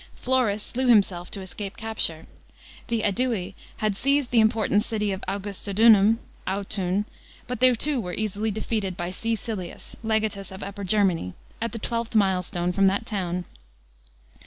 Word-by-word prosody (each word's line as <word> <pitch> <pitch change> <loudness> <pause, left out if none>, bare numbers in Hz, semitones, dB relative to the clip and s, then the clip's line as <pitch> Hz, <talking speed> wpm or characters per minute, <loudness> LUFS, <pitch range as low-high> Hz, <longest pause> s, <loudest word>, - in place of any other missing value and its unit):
Florus 245 -5 +1
slew 255 +1 -2
himself 195 -6 +4
to 195 - -6
escape 195 +1 -6
capture. 190 -8 -2 0.6
The 230 -2 0
JSdui 205 -3 0 0.2
had 215 -2 0
seized 275 +3 +1
the 240 - +5
important 220 -2 +3
city 210 -3 -1
of 190 - -4
Augustodunum 205 +2 +4 0.3
(Autun), 195 0 0 0.4
but 250 -2 -4
they 255 +1 +7
too 280 +2 0
were 180 -3 -4
easily 215 0 -1
defeated 210 -3 -2
by 175 +1 -3
C. 225 +5 -1
Silius, 205 -6 -6
legatus 220 -3 -1
of 190 +1 -7
Upper 200 0 -6
Germany, 185 - +1 0.3
at 230 -1 -1
the 230 - -5
twelfth 230 +1 -3
milestone 180 -3 +2
from 195 +2 +4
that 200 +3 +1
town. 180 -4 -2
205 Hz, 150 wpm, -25 LUFS, 190-225 Hz, 0.6 s, they